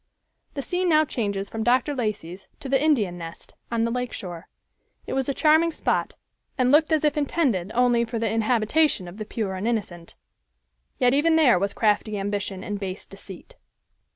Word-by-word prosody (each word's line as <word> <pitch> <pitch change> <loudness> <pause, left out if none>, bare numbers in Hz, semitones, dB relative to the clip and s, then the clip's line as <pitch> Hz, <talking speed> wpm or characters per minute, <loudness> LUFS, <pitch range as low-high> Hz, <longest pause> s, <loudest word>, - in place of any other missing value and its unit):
The 275 - -3
scene 360 +3 -1
now 310 -1 +4
changes 200 -7 -3
from 225 +2 -5
Dr. 255 +5 +2
Lacey's 200 -7 -4
to - - -7
the 270 +1 +2
"Indian 210 - +1
Nest," 165 0 -9 0.2
on 230 -1 +1
the 230 - 0
lake 250 0 -3
shore. 175 -3 -7 0.6
It - - -5
was 265 0 -1
a - - +1
charming 315 +2 +4
spot, 330 - -1 0.4
and 255 -1 +3
looked 305 +2 +4
as 315 -1 +2
if 300 0 +1
intended 260 - 0
only 240 -1 +3
for 230 0 -4
the 225 0 0
inhabitation 225 - +1
of 175 +3 -10
the 215 - -5
pure 210 -3 -3
and 190 +4 -3
innocent. 190 -7 -4 0.8
Yet 250 0 +3
even 320 +4 +3
there 275 - +5
was 200 +1 -2
crafty 210 -1 +1
ambition 200 -1 -3
and 205 -1 -4
base 190 -1 -5
deceit. 195 -2 -12
230 Hz, 180 wpm, -24 LUFS, 200-280 Hz, 0.8 s, there